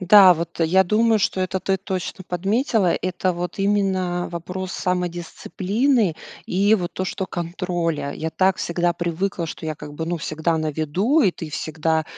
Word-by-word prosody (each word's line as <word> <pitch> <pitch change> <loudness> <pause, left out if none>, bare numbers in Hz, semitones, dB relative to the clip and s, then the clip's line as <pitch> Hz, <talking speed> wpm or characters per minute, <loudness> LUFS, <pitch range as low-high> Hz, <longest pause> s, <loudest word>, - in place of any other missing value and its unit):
Да, 190 -1 +8
вот, 170 +1 -5
э, 165 - +4
я 190 +3 +4
думаю, 220 +3 +3
что 190 -1 0
это 185 0 -1
ты 190 +1 +1
точно 190 -1 -5
подметила- 195 +2 +1
это 185 0 0
вот 175 +2 -5
именно 190 -3 +1
вопрос 180 +2 -5
самодисциплины 180 - 0 0.3
и 200 +4 +3
вот 175 -4 -2
то, 185 - -3
что 190 0 -3
контроля. 170 -4 -2
Я 160 +1 -4
так 190 +2 +2
всегда 175 0 0
привыкла, 170 +1 -2
что 160 - -7
я, 155 - -2
как 145 0 -10
бы, 160 - -3
ну, 175 - -1
всегда 160 +1 -1
на 155 -1 -1
виду, 175 - +1
и 200 - +4
ты 165 -2 -8
всегда 160 +1 -1
180 Hz, 175 wpm, -22 LUFS, 165-190 Hz, 0.3 s, Да